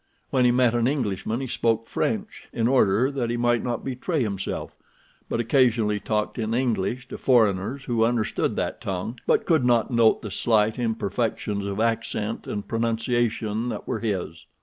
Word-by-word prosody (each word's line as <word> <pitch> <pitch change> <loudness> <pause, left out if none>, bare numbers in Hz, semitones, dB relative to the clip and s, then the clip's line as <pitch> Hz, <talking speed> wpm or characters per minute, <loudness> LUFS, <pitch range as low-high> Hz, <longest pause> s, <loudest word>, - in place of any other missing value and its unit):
When 130 -2 +3
he 120 - +5
met 125 -1 +3
an 120 0 +2
Englishman 115 -4 -1
he 135 - -3
spoke 115 -1 0
French 215 -1 -3
in 115 -1 0
order 125 0 +3
that 130 -4 -2
he 120 - -1
might 120 -1 +2
not 120 -2 -3
betray 135 +3 -1
himself, 100 -3 -4 0.5
but - - -1
occasionally 115 -4 +2
talked 105 +3 -2
in 110 0 -1
English 125 0 -1
to - - -7
foreigners 115 +1 +2
who 120 -4 +1
understood 115 -1 0
that - - -3
tongue, 100 +6 -4
but - - +3
could 160 -6 +3
not 120 0 +2
note 115 -1 +3
the 105 - -5
slight 110 +1 +2
imperfections 110 -2 -1
of 100 +1 -3
accent 115 -1 -1
and 105 -1 -4
pronunciation 115 -1 0
that - - -5
were 110 - -2
his. 95 -8 -3
115 Hz, 170 wpm, -25 LUFS, 105-125 Hz, 0.5 s, he